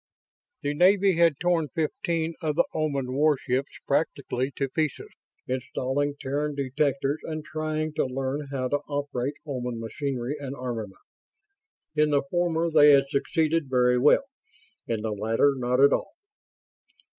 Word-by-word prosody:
The 145 0 0
Navy 190 +3 +4
had 165 -4 +4
torn 175 -3 +1
fifteen 165 +1 -1
of 155 -3 -1
the - - +4
Oman 140 -5 -1
warships 140 -2 +1
practically 140 -3 -1
to 135 - -1
pieces, 155 0 -2 0.4
installing 135 +2 -2
Terran 145 +2 -2
detectors 140 +1 0
and 155 -1 -5
trying 155 0 -3
to - - +2
learn 135 +3 -3
how 130 -2 -2
to 145 - +2
operate 145 -2 -2
Oman 125 -5 -4
machinery 130 +3 -3
and 140 -1 -5
armament. 115 -7 -5 0.9
In 150 0 +3
the 145 -1 +2
former 170 -2 +1
they 150 -1 +7
had 135 0 +4
succeeded 160 +1 0
very 125 -1 +3
well; 145 - +5 0.6
in 110 -2 -2
the 110 - -1
latter 110 +7 +2
not 125 0 0
at 140 +1 +6
all. - - -2
140 Hz, 140 wpm, -26 LUFS, 130-155 Hz, 0.9 s, they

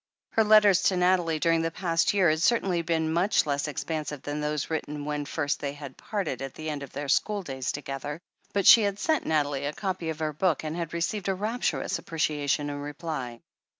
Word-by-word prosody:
Her 225 - +3
letters 210 -3 +6
to 185 - +3
Nathalie 180 -3 +2
during 165 +1 +2
the 165 - 0
past 165 -1 +1
year 190 -5 +4
had 155 +1 -1
certainly 190 -5 +2
been 160 -1 0
much 185 +3 +3
less 140 0 -1
expansive 150 0 -4
than 145 +1 -3
those 150 +1 -2
written 150 -2 -3
when 150 -1 -2
first 145 0 -1
they 140 -1 -3
had 145 -2 -9
parted 185 - -3
at 135 -1 -6
the 155 0 -4
end 145 -1 -5
of 140 - -8
their 145 +1 -5
school 205 +8 +1
days 130 -5 -3
together, 145 +1 -5 0.3
but 200 -1 0
she 230 - +10
had 200 -1 0
sent 315 +8 0
Nathalie 145 -3 0
a 150 - -3
copy 185 -4 -3
of 160 - -3
her 155 -1 -2
book 160 0 +1
and 155 +1 -3
had 170 -1 -4
received 185 +4 -1
a 190 - +1
rapturous 220 +6 -1
appreciation 145 -2 -1
in 145 - -5
reply. 145 -5 -5
160 Hz, 210 wpm, -27 LUFS, 145-185 Hz, 0.3 s, she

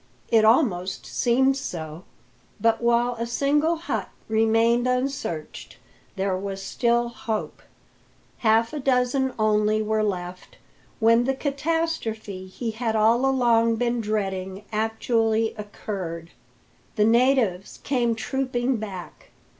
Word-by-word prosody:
It 225 -1 +4
almost 210 - +2
seemed 265 +3 +2
so; 165 - -6 0.5
but 225 0 +2
while 240 +1 +2
a 235 - -2
single 295 +6 +1
hut 335 +2 -4 0.2
remained 225 +2 +2
unsearched 250 - -3 0.4
there 190 -1 0
was 195 0 -5
still 235 +3 +1
hope. 225 -2 -4 0.8
Half 225 +3 +3
a 300 - -3
dozen 260 0 +1
only 215 0 +2
were 215 0 0
left, 180 -3 -4 0.4
when 230 +1 +4
the 270 +1 0
catastrophe 275 - -2
he 225 +5 -4
had 225 0 -2
all 230 +4 +3
along 230 -3 +3
been 240 0 0
dreading 195 -2 -3
actually 225 0 0
occurred. 190 -5 -6 0.6
The 210 - +3
natives 230 -5 +2
came 240 -4 +1
trooping 255 +1 -1
back. 195 -5 -8
225 Hz, 115 wpm, -24 LUFS, 210-250 Hz, 0.8 s, It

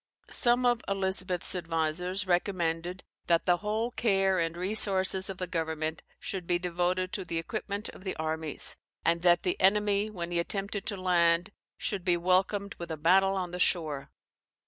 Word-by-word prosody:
Some 245 0 +4
of 240 -1 +3
Elizabeth's 190 -2 -1
advisers 175 +3 -1
recommended 175 -1 -1 0.2
that 170 -1 +3
the 175 -1 +4
whole 215 +4 -2
care 195 -5 +2
and 165 0 -1
resources 190 0 +2
of 190 - -5
the 185 - -2
government 160 -2 -3 0.2
should 185 -3 -5
be 175 - +3
devoted 180 +1 -1
to 195 - -2
the 170 -2 -3
equipment 205 +3 -4
of - - -12
the 190 - -3
armies, 160 -1 -1 0.3
and 170 0 +2
that 175 -1 +4
the 180 - -1
enemy, 205 +1 +3
when 175 -4 -5
he 170 - +1
attempted 195 +3 -3
to 205 - -2
land, 175 0 +2 0.3
should 195 -3 -3
be 175 -1 +2
welcomed 190 +3 +1
with 170 0 -6
a 160 - -4
battle 190 +5 +4
on 180 -2 -3
the 180 - -5
shore. 155 -6 0
185 Hz, 170 wpm, -29 LUFS, 170-195 Hz, 0.3 s, Some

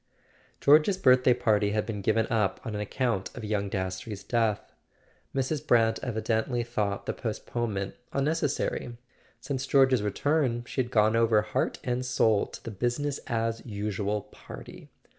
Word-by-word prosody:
George's 155 +7 +5
birthday 125 -6 +5
party 105 -2 +2
had 105 -1 0
been 105 -3 -4
given 110 +2 +2
up 105 -4 +1
on 115 - -4
ac¬ 105 -1 -4
count 115 -7 -1
of 120 - -6
young 105 -2 -1
Das 95 -1 -2
trey's 100 -2 -7
death. 110 -1 0 0.6
Mrs. 135 +2 -1
Brant 115 -2 +4
evidently 120 0 -1
thought 105 -4 -2
the - - -2
postponement 110 -3 -3 0.2
unnecessary; 140 -4 -1 0.4
since 135 -1 -4
George's 130 -3 +4
return 120 +3 0
she 130 - -1
had 120 - -4
gone 110 -2 +3
over 115 -2 +4
heart - - -1
and 125 0 -1
soul 115 -4 +2
to - - -11
the 115 - -6
"busi¬ 120 +4 -1
ness 145 -1 -2
as 115 -1 -1
usual" 105 -1 -2
party. - - -12
115 Hz, 155 wpm, -28 LUFS, 105-125 Hz, 0.6 s, George's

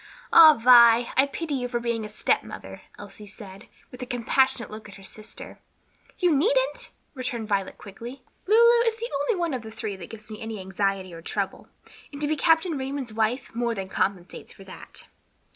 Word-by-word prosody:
"Ah, 315 -2 +9
Vi, 235 -1 +6
I 270 +2 +4
pity 315 +1 -5
you 250 -2 -2
for 240 -1 -2
being 235 -1 -2
a 210 - -7
stepmother," 210 - -3 0.2
Elsie 210 -2 -11
said, 200 0 -12 0.2
with 250 - -11
a 250 - -5
compassionate 245 0 0
look 215 0 -10
at 200 - -13
her 195 - -14
sister. 215 +3 -11 0.6
"You 355 -5 +2
needn't," - - +1 0.2
returned 250 -5 -4
Violet 200 -2 -2
quickly. 235 +6 -10 0.2
"Lulu 470 +3 +5
is 450 - +1
the 465 +1 -6
only 365 +6 0
one 340 -4 -1
of 255 - -3
the 220 - -10
three 220 -2 -5
that 180 - -10
gives 215 -1 -11
me 215 - -8
any 220 -2 -6
anxiety 190 -1 -2
or 165 - -10
trouble, - - -4 0.4
and 285 - -9
to 295 - +2
be 310 - 0
Captain 325 0 +2
Raymond's 265 -3 -5
wife 225 +4 -1
more 235 0 -1
than 190 -2 -6
compensates 190 -2 -3
for 195 - -14
that." 190 - -11
235 Hz, 190 wpm, -25 LUFS, 210-285 Hz, 0.6 s, Ah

